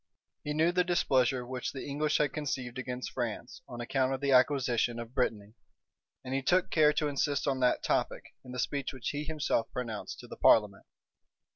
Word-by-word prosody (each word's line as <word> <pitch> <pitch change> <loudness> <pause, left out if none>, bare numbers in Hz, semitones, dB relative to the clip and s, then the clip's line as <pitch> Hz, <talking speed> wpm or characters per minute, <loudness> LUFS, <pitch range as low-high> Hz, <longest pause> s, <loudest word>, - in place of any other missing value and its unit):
He 150 - -2
knew 160 +3 +3
the 180 0 +2
displeasure 130 -8 +1
which 125 0 -4
the 135 - -6
English 150 +2 0
had 145 -3 +1
conceived 130 -4 -3
against 125 0 -5
France 120 +3 -4
on 120 - -8
account 130 +2 0
of - - -7
the 140 0 0
acquisition 125 -3 +3
of 120 0 -7
Brittany; 110 -5 -1 0.7
and 130 - -4
he 135 - 0
took 180 +6 +2
care 150 -2 +5
to 150 - 0
insist 145 0 -1
on 135 -2 +1
that 125 -1 +2
topic, - - -1
in 125 - -11
the 125 - -6
speech 140 +2 -2
which 130 -2 -4
he 145 +1 -3
himself 150 -7 -1
pronounced 115 -4 -5
to - - -12
the - - -10
parliament. 105 -3 +4
130 Hz, 190 wpm, -30 LUFS, 125-145 Hz, 0.7 s, care